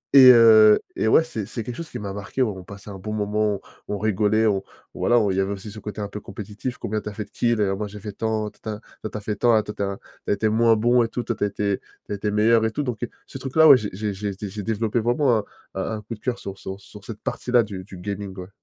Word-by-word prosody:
Et 130 -2 +11
heu, 110 -3 +8 0.2
et - - +1
ouais, 160 +8 +6
c'est 110 -10 -5
c'est 115 - -5
quelque 120 +2 -6
chose 165 +4 -7
qui 125 - -6
m'a 100 -1 -5
marqué, 105 +6 -2
on 105 -5 -1
on 95 - -9
passait 100 +2 -11
un 95 - -8
bon 105 +3 -5
moment, 105 0 0
on - - -9 0.3
on - - -3
rigolait, 110 +1 +2
on 100 -3 +2 0.3
voilà, 120 - +2
on 105 -3 +2
il 95 - -2
y - - +3
avait 95 +1 -1
aussi 100 +1 -8
ce 110 - -9
côté 105 0 -6
un 100 - -2
peu 105 - -6
compétitif, 105 +5 -6
«Combien 110 +1 -2
tu - - -10
as - - -9
fait 105 +1 -4
de - - -26
kills?», 120 -3 +1
et - - +4
«Ah 95 - 0
moi, 105 +1 -3
j'ai 105 +1 -9
fait 105 0 -5
tant, 110 0 -2
tin - - -28
tin», 110 0 -5 0.2
«Toi, 110 - -4
tu - - -5
as - - -6
fait 105 +1 -3
tant, 120 +1 +4
ah 110 - +3
toi 105 - -6
tu - - -5
es - - +1
un 100 0 -4 0.3
tu - - +1
as - - +5
été 105 +2 +1
moins 115 +1 +4
bon», 120 +2 +3
et - - 0
tout, 120 +1 -4
«Tu 120 - -1
as - - +2
été 100 -1 -1 0.3
tu - - -11
as - - 0
été 105 +1 -2
meilleur», 110 +2 +4
et 110 - 0
tout. 145 - -2
Donc, 125 -5 -4
heu, 120 - -2 0.2
ce - - -8
truc-là, 145 +4 +4
ouais, 140 - +10
j'ai 105 -4 -4
j'ai 105 +1 -3
j'ai 100 +1 -3
dé 100 +1 -6
j'ai 105 +2 -6
développé 110 +2 0
vraiment 120 +1 +2
un 105 - -6 0.3
un 95 - -1
un - - -8
coup 105 +3 -7
de - - -21
cœur 125 +2 -2
sur 100 -1 -7
sur 95 +1 -7
sur 105 0 -13
cette 110 -3 -8
partie-là 125 -1 +1
du 100 -3 -7
du 95 - -11
gaming, 100 +1 -5
ouais. 90 +1 -7
105 Hz, 320 wpm, -23 LUFS, 100-115 Hz, 0.3 s, Et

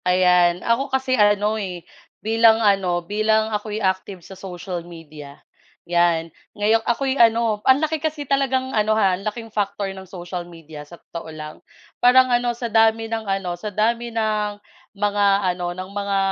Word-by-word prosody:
Ayan, 180 -1 +3
ako 250 +4 +1
kasi 265 -1 -1
ano 210 -1 +2
eh, 180 -3 -6 0.4
bilang 225 0 +5
ano, 195 -5 +1
bilang 215 +2 +1
ako'y 210 0 -3
active 190 -2 -2
sa - - -11
social 180 -1 -6
media. 155 -4 -12 0.5
'Yan, 170 -2 +1 0.2
ngayon 215 +2 +2
ako'y 265 +2 +1
ano, 225 -2 +3
ang 260 - +7
laki 315 0 -1
kasi 305 -2 -3
talagang 265 -1 0
ano 215 0 +2
ha, 195 -4 +3
ang 180 - -4
laking 225 +1 -5
factor 205 -1 -2
ng 190 -1 -11
social 180 -1 -6
media 160 -3 -11
sa 170 - -12
totoo 165 -1 -9
lang, 155 -1 -8 0.5
parang 255 0 +5
ano 240 0 +2
sa 240 - -5
dami 225 0 +3
ng 220 -2 -4
ano, 195 -2 -1
sa 175 +5 -6
dami 230 +4 0
ng 215 -2 -1 0.4
mga 205 0 +1 0.3
ano, 175 0 -4
ng 185 0 -6
mga 200 -1 -1
205 Hz, 165 wpm, -21 LUFS, 180-225 Hz, 0.5 s, ang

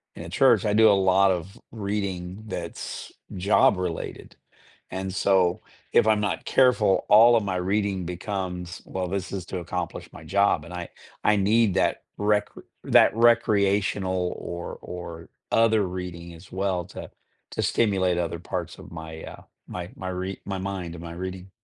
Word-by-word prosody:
in - - -8
a - - -8
church. - - +4
I 105 - +2
do 110 +1 +6
a - - +7
lot 95 +1 +5
of 90 +2 -4
reading 100 -2 -4
that's 90 -4 -6 0.2
job-related. 90 -2 +1 0.6
And 95 0 -4
so, 95 -2 +2 0.3
if 110 - +5
I'm 105 -1 +4
not 105 - -2
careful, 125 -7 +3
all 115 +3 +8
of 110 - +2
my 95 -2 -2
reading 95 0 0
becomes, 90 -1 -4
"Well, 95 -1 -3
this 95 -1 -3
is 95 -3 -4
to 95 - -4
accomplish 90 +1 -5
my - - -11
job," 100 -5 +2
and 90 - -10
I 90 -1 -5 0.3
I 105 - +4
need 105 +1 +3
that - - +1 0.2
recr 105 0 0 0.2
that - - +6
recreational 100 -5 +2
or 85 0 -6
or 85 -2 -8 0.2
other 110 -3 +4
reading 90 -2 -6
as 85 +3 -15
well 95 -2 -1
to - - -9 0.4
to - - -2
stimulate 95 -5 +2
other 85 -1 -2
parts - - -5
of - - -12
my, 80 -1 -8
uh, - - -9 0.3
my 90 -1 -6
my 95 -1 -5
rea 95 +1 -4
my 95 -1 -3
mind 95 -3 -4
and 85 - -9
my 85 0 -7
reading. 95 +1 -6
95 Hz, 165 wpm, -25 LUFS, 90-100 Hz, 0.6 s, all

